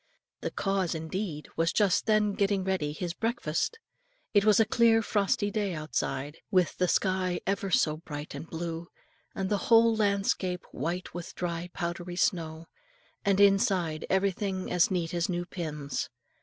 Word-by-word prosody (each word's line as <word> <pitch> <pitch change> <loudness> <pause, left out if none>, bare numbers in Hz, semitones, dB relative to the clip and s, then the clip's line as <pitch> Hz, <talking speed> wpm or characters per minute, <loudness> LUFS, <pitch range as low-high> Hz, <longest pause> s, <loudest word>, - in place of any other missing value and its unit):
The - - -3
cause 195 -4 -1
indeed 160 -1 -4
was 165 +1 +2
just 205 -2 +2
then 215 -1 +3
busy - - -8
getting 200 -1 +2
ready 185 -6 0
his 170 +3 -4
breakfast. 225 - -1 0.6
It 205 -2 +5
was 215 0 +5
a 225 - +6
clear 225 0 +4
frosty 205 -1 +1
day 205 -5 -1
outside, 145 -1 -3
with 185 -4 +2
the 180 - +3
sky 185 -1 +1
ever 195 0 -1
so 155 -3 +2
bright 150 -2 -7
and 165 - -7
blue, 165 0 -4 0.5
and 195 - -1
the 205 - +1
whole 230 0 +6
landscape 200 -3 0
white 170 +7 -3
with 175 -1 -7
dry 175 0 -3
powdery 175 +1 -3
snow; 165 -3 0 0.6
and 200 -1 +2
inside 190 -5 +3
everything 190 0 0
was - - -6
as 180 -1 +4
neat 175 -3 -1
as 170 +1 0
new 175 -1 -1
pins. 150 -5 -4
180 Hz, 160 wpm, -29 LUFS, 165-200 Hz, 0.6 s, a